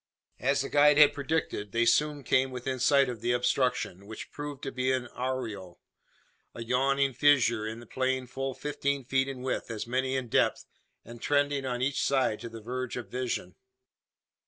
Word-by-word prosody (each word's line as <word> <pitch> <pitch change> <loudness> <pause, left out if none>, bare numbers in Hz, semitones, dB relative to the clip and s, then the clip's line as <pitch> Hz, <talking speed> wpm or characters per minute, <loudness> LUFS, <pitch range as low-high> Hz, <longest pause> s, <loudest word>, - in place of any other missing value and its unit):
As 140 +2 +1
the 135 - -4
guide 145 0 +5
had 150 -1 +7
predicted, 140 -8 -2
they 115 +1 +2
soon 150 +3 +2
came 130 +1 +2
within 130 +1 -4
sight 140 +2 +4
of 120 -4 -5
the 120 +1 +1
obstruction; 125 -6 0
which 110 - -8
proved 145 -2 -7
to 135 - -3
be 130 0 0
an 130 -2 -1
arroyo 115 -8 -4 0.8
a 115 - -5
yawning 135 +3 +1
fissure 120 -6 +3
in 110 +1 -6
the 120 - -12
plain 130 +2 -1
full 135 +1 -4
fifteen 140 -2 -2
feet 135 +1 +1
in 130 -2 -6
width, 130 - -2
as 110 -2 -4
many 130 +2 -1
in 130 -2 -2
depth, - - +1 0.4
and 120 0 -11
trending 145 -1 +1
on 125 0 -2
each 140 +1 0
side 130 -6 +1
to 115 - -7
the 115 0 -9
verge 125 +2 -4
of 120 - -6
vision. 125 -1 -3
130 Hz, 180 wpm, -29 LUFS, 120-140 Hz, 0.8 s, had